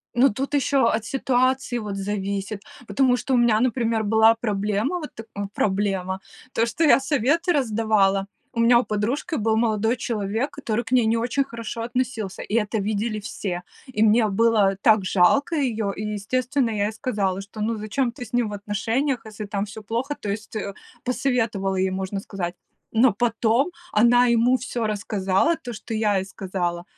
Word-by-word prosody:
Ну, 255 +3 +5
тут 270 +7 -4
еще 280 0 +1 0.2
от 220 0 -1
ситуации, 255 0 +1
вот, 210 -3 -5
зависит, 200 0 -3 0.3
потому 260 -2 +3
что 260 +3 -2
у 250 - +5
меня, 235 -3 +4
например, 230 -3 +1
была 220 +1 +5
проблема, 215 - -1
вот, 300 - -7
тк 225 0 -9 0.3
проблема 190 -2 0 0.3
то, 230 - +2
что 280 +8 -1
я 295 - +6
советы 295 - +1
раздавала. 215 -6 +2 0.3
У 230 - -3
меня 235 +1 +6
у - - 0
подружки 235 +11 -2
был 220 -2 +1
молодой 220 0 +1
человек, 225 +3 -2
который 240 -5 -2
к 225 - -11
ней 250 -3 +4
не 220 +1 +2
очень 240 +4 0
хорошо 230 -2 -6
относился, 235 -5 -3
и 210 - -4
это 220 -1 +1
видели 215 +1 -2
все. 185 -4 -4 0.2
И 220 -4 0
мне 220 +1 +4
было 210 -1 +3
так 215 -4 +4
жалко 275 - +3
ее, 225 -8 0
и, 210 - -5
естественно, 240 +5 -1
я 205 -2 0
ей - - -3
сказала, 205 -6 -1
что, 205 +2 -9
ну, 225 +1 -1
зачем 235 +4 -1
ты 245 +1 -8
с 220 - -16
ним 240 -3 +1
в - - -6
отношениях, 225 +6 -1
если 215 -1 -7
там 200 -1 -2
всё 215 +1 -9
плохо, 240 +7 -2
то 210 - -5
есть, 215 +2 -5
э, 200 -1 -4 0.3
посоветовала 225 -7 0
ей, 190 0 +1
можно 190 +1 -3
сказать. 180 -3 -5 0.4
Но 230 0 +4
потом 235 - +1 0.2
она 240 +3 +5
ему 240 +2 +4
всё 245 -2 -3
рассказала, 210 - +1
то, 260 -7 -8
что 225 +1 -7
я 215 -2 +2
ей 190 - -1
сказала, 180 -3 -3
220 Hz, 180 wpm, -23 LUFS, 205-245 Hz, 0.4 s, я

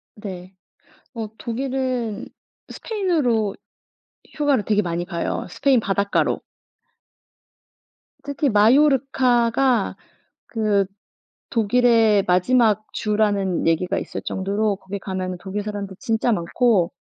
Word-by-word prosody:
네. 190 -3 -8 0.6
어 225 -2 -4
독일은 255 -2 -3 0.4
스페인으로 295 - 0 0.8
휴가를 285 -8 +2
되게 210 -1 +2
많이 175 -1 -2
가요. 170 -1 -3
스페인 265 +4 +2
바닷가로. 200 -1 0 1.8
특히 285 0 -1
마요르카가 250 0 +3 0.5
그 210 -3 +1 0.7
독일의 225 -2 +3
마지막 215 +4 +3
주라는 205 -4 0
얘기가 165 +2 +1
있을 - - -6
정도로 200 +2 -1
거기 195 +1 -7
가면은 185 -2 -4
독일 200 +2 -4
사람들 200 -3 -5
진짜 225 +1 0
많고 190 0 +1
215 Hz, 230 characters per minute, -22 LUFS, 195-245 Hz, 1.8 s, 마요르카가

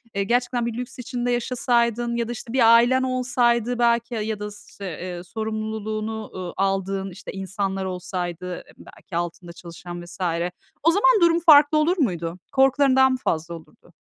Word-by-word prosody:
eee, 200 - +1
gerçekten 245 +2 0
bir 235 - -2
lüks 250 0 -7
içinde 245 0 -2
yaşasaydın 240 -1 0
ya 235 -1 -1
da, - - -4
işte, 235 0 -7
bir 230 -3 +6
ailen 255 +3 +4
olsaydı 245 -2 +1
belki 235 0 +2
ya 220 - -2
ya 215 -1 -3
da 210 0 -5
s 205 - -13
işte, 200 - -9 0.2
eee, 180 -1 -6
sorumluluğunu, 220 +1 -4
ııı, 180 -2 -5
aldığın, 195 0 -1
işte, 180 - -9
insanlar 195 0 -3
olsaydı, 180 -1 -4
eee, - - -19
belki 180 - -12
altında 175 0 -5
çalışan 175 0 -9
vs. 175 +2 -12 0.6
o 330 - +5
zaman 425 +3 +4
durum 340 0 +5
farklı 305 -2 +6
olur 335 +5 +2
muydu? 175 - -1
Korkuların 270 0 +4
daha 265 0 +6
mı 255 - 0
fazla 165 +1 -1
olurdu? 160 - -16
225 Hz, 175 wpm, -23 LUFS, 190-250 Hz, 0.6 s, bir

